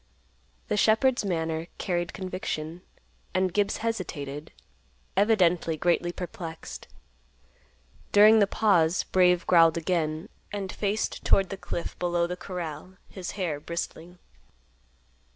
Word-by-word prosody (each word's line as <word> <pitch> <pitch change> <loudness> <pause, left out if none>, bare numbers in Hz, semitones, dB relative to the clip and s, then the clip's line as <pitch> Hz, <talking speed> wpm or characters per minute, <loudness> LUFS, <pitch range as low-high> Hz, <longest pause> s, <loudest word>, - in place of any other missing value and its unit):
The - - 0
shepherd's 225 +4 +3
manner 165 -3 -2
carried 175 -2 -1
conviction, 180 -3 -5 0.5
and 185 -1 +1
Gibbs 205 -1 +1
hesitated, 150 -10 -4 0.6
evidently 180 -6 +3
greatly 175 +1 +1
perplexed. 170 -2 -7 1.2
During 215 +2 +7
the 200 - +4
pause, 180 -6 +3
Brave 180 -1 +3
growled 165 -2 +5
again, 165 0 -1 0.2
and 195 -2 -4
faced 210 +1 -2
toward 195 -2 +3
the - - -4
cliff 170 - -5
below 175 -1 +1
the 180 +1 -3
corral, 180 -1 -7
his 185 -3 -6
hair 170 -7 -2
bristling. 170 +2 -6
180 Hz, 110 wpm, -27 LUFS, 165-195 Hz, 1.2 s, During